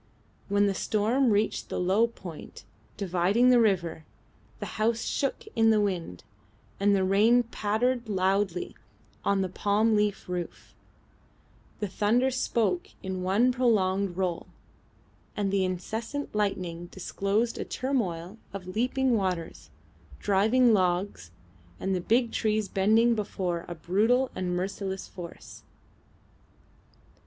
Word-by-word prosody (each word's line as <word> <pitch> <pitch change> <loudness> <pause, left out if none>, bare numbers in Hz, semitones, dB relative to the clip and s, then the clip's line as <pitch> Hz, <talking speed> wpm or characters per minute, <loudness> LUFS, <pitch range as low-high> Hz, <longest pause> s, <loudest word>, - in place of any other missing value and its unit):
When 205 0 +3
the 200 - +1
storm 225 +7 +1
reached 210 0 0
the - - -3
low 190 +6 +3
point 180 -8 -10 0.3
dividing 195 +5 +2
the 245 - +6
river, 175 -8 +1 0.6
the - - -4 0.2
house 225 +1 +1
shook 275 - -2
in 225 -1 +4
the 220 -1 +4
wind, 175 - -2 0.6
and 200 0 +3
the 190 - +2
rain 215 +6 +4
pattered 235 +2 -1
loudly 190 -1 0 0.5
on 200 -1 +2
the - - -1
palm 210 +4 +1
leaf 210 -1 0
roof, 180 -1 -6 1.1
the 210 - -1
thunder 230 +7 +2
spoke 220 -7 0 0.2
in 190 -1 -4
one 200 +7 +3
prolonged 200 -7 +1
roll, 180 -3 -2 0.9
and 200 -2 0
the 195 -1 +2
incessant 220 +10 -4
lightning 185 -5 -2
disclosed 200 +5 -1
a - - -1
turmoil 210 -7 -3
of 195 -2 -6
leaping 255 +2 +1
waters, 185 -5 -3 0.5
driving 220 +5 +3
logs, 180 - 0 0.5
and 190 - -1
the 180 - -1
big 230 +5 +2
trees 215 -1 0
bending 220 +5 +3
before 185 -5 -3
a 175 - -6
brutal 220 +10 +1
and 180 -1 -2
merciless 190 +1 -3
force. 175 -2 -10
200 Hz, 125 wpm, -28 LUFS, 185-225 Hz, 1.1 s, the